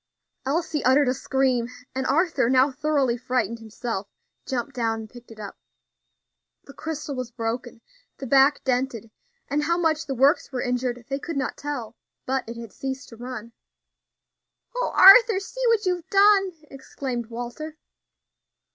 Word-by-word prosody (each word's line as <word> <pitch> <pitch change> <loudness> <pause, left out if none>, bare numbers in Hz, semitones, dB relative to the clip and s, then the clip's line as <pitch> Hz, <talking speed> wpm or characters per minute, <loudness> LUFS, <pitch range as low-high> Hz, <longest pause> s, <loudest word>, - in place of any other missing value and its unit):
Elsie 315 +1 -1
uttered 265 +2 +4
a 250 - +2
scream, 260 -2 0 0.3
and 265 0 -2
Arthur, 325 -3 +2
now 260 +2 +4
thoroughly 275 -3 +1
frightened 235 -2 -2
himself, 220 -2 -5 0.4
jumped 260 +1 -3
down 225 -3 -1
and 220 - -10
picked 245 -1 -14
it 225 -1 -13
up. 205 -2 -8 1.1
The 275 - -14
crystal 305 -2 -5
was 255 -2 -4
broken, 230 +1 -4 0.4
the 270 - -7
back 270 +3 +4
dented, 245 -4 -1 0.4
and 290 +1 0
how 335 +3 +1
much 320 -2 0
the 270 - -2
works 275 +5 +3
were 255 -2 -2
injured 245 -1 -2
they 275 0 -3
could 330 0 -5
not 260 - -2
tell; 255 -6 -5 0.3
but 265 -3 -2
it 230 - -7
had 230 -4 -9
ceased 265 +1 -5
to 230 - -12
run. 235 -1 -8 1.2
"O - - 0
Arthur! 425 +1 +8
see - - -8
what 450 -3 +3
you've 360 -1 -1
done!" 395 -1 +5 0.2
exclaimed 265 -3 -5
Walter. 245 +7 -7
265 Hz, 155 wpm, -24 LUFS, 240-300 Hz, 1.2 s, Arthur